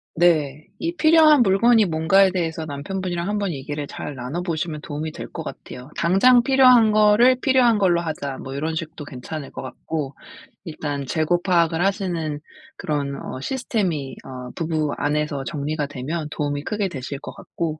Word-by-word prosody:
네. 155 Hz, -4 st, +2 dB
이 335 Hz, +1 st, -3 dB
필요한 315 Hz, -3 st, +6 dB
물건이 225 Hz, +2 st, +4 dB
뭔가에 180 Hz, +4 st, +4 dB
대해서 165 Hz, -3 st, -2 dB
남편분이랑 175 Hz, +4 st, -4 dB
한번 205 Hz, -2 st, -1 dB
얘기를 145 Hz, 0 st, -5 dB
잘 145 Hz, -, -6 dB
나눠보시면 155 Hz, +4 st, -3 dB
도움이 155 Hz, +1 st, -5 dB
될 -, -, -8 dB
것 -, -, -5 dB
같아요. 125 Hz, +2 st, -9 dB
"당장 235 Hz, +8 st, +5 dB
필요한 255 Hz, -4 st, +6 dB
거를 215 Hz, +4 st, +5 dB
필요한 250 Hz, -5 st, +4 dB
걸로 180 Hz, -3 st, +3 dB
하자." 150 Hz, -5 st, -4 dB
뭐 135 Hz, -, -7 dB
요런 160 Hz, +3 st, -2 dB
식도 160 Hz, -2 st, -6 dB
괜찮을 140 Hz, +2 st, -7 dB
것 -, -, -7 dB
같고 140 Hz, +2 st, -5 dB, 0.5 s
일단 145 Hz, -4 st, -4 dB
재고 165 Hz, +4 st, +1 dB
파악을 170 Hz, -2 st, +2 dB
하시는 175 Hz, -7 st, -1 dB, 0.4 s
그런 140 Hz, -2 st, -2 dB
어 130 Hz, -, -6 dB
시스템이 185 Hz, -, -2 dB
어 125 Hz, -1 st, -8 dB
부부 155 Hz, -3 st, -1 dB
안에서 150 Hz, -1 st, -1 dB
정리가 145 Hz, +4 st, -3 dB
되면 145 Hz, +4 st, -4 dB
도움이 145 Hz, -1 st, -3 dB
크게 205 Hz, 0 st, -2 dB
되실 135 Hz, -2 st, -6 dB
것 -, -, -9 dB
같고 155 Hz, -2 st, -5 dB
160 Hz, 340 characters per minute, -22 LUFS, 145-195 Hz, 0.5 s, 필요한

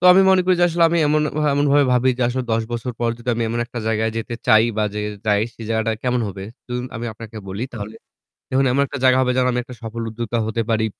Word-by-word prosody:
তো -, -, -4 dB
আমি 190 Hz, -, +6 dB
মনে 190 Hz, -1 st, +5 dB
করি 185 Hz, 0 st, +4 dB
যে 175 Hz, -, +6 dB
আসলে 170 Hz, 0 st, +2 dB
আমি 170 Hz, -, +2 dB
এমন, 150 Hz, +1 st, +2 dB, 0.3 s
এমনভাবে 145 Hz, 0 st, +3 dB
ভাবি 125 Hz, +1 st, +3 dB
যে -, -, +1 dB
আসলে 130 Hz, +1 st, -2 dB
১০ 115 Hz, 0 st, +1 dB
বছর 120 Hz, +1 st, -3 dB
পর 120 Hz, -, +1 dB
যদি 120 Hz, +1 st, -10 dB
আমি 115 Hz, -, -1 dB
এমন 120 Hz, +1 st, -2 dB
একটা 120 Hz, -, -7 dB
জায়গায় 110 Hz, 0 st, +1 dB
যেতে 115 Hz, +1 st, -4 dB
চাই 110 Hz, -2 st, +6 dB
বা 105 Hz, -, +1 dB
যে 105 Hz, -, -2 dB, 0.3 s
যাই 105 Hz, 0 st, +3 dB
সে 115 Hz, -, -10 dB
জায়গাটা 110 Hz, 0 st, +1 dB
কেমন 125 Hz, -1 st, +1 dB
হবে? 95 Hz, 0 st, -7 dB, 0.2 s
ধরুন 125 Hz, 0 st, -3 dB
আমি 115 Hz, -, -5 dB
আপনাকে 110 Hz, 0 st, -11 dB
বলি 100 Hz, +5 st, -3 dB
তাহলে 110 Hz, -2 st, -7 dB, 0.6 s
দেখুন 135 Hz, +1 st, +2 dB
এমন 140 Hz, +2 st, +2 dB
একটা 140 Hz, -, -6 dB
জায়গা 130 Hz, 0 st, +5 dB
হবে 125 Hz, -1 st, +1 dB
যেন 130 Hz, 0 st, +3 dB
আমি 125 Hz, -, -1 dB
একটা 125 Hz, +1 st, -11 dB
সফল 115 Hz, +1 st, -5 dB
উদ্যোক্তা 115 Hz, +1 st, -3 dB
হতে 115 Hz, +1 st, -1 dB
পারি। 110 Hz, 0 st, +2 dB
120 Hz, 250 wpm, -21 LUFS, 110-130 Hz, 0.6 s, আমি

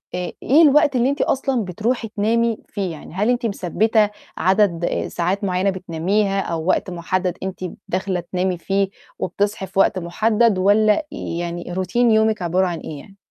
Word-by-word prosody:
آآ، 180 Hz, -1 st, -3 dB
إيه 290 Hz, +5 st, +5 dB
الوقت 300 Hz, -2 st, +5 dB
اللي 250 Hz, +1 st, +3 dB
أنتِ 280 Hz, -, -1 dB
أصلًا 260 Hz, -4 st, 0 dB
بتروحي 225 Hz, +6 st, -2 dB
تنامي 225 Hz, +1 st, +1 dB
فيه، 195 Hz, -4 st, -3 dB
يعني 155 Hz, -1 st, -10 dB
هل 205 Hz, +5 st, 0 dB
أنتِ 245 Hz, -1 st, +1 dB
مثبّتة 215 Hz, +2 st, +1 dB, 0.3 s
عدد 185 Hz, -3 st, +2 dB, 0.2 s
ساعات 185 Hz, +4 st, -2 dB
معيّنة 185 Hz, 0 st, +1 dB
بتناميها 190 Hz, +2 st, 0 dB
أو 165 Hz, -3 st, -3 dB
وقت 185 Hz, +1 st, +1 dB
محدَّد 180 Hz, +1 st, -2 dB
أنتِ 190 Hz, -2 st, -5 dB, 0.3 s
داخلة 185 Hz, 0 st, -1 dB
تنامي 180 Hz, +1 st, -2 dB
فيه، 195 Hz, +2 st, 0 dB, 0.3 s
وبتصحي 200 Hz, 0 st, -2 dB
في 190 Hz, -, -3 dB
وقت 190 Hz, -1 st, +3 dB
محدَّد، 215 Hz, +5 st, +2 dB
والّا 210 Hz, +8 st, +3 dB
يعني 175 Hz, +1 st, -5 dB
Routine 185 Hz, +1 st, -4 dB
يومِك 220 Hz, -3 st, +3 dB
عبارة 180 Hz, +2 st, +1 dB
عن 170 Hz, -2 st, -3 dB
إيه 150 Hz, -2 st, -7 dB
يعني؟ 195 Hz, -, -15 dB
195 Hz, 160 wpm, -21 LUFS, 180-220 Hz, 0.3 s, إيه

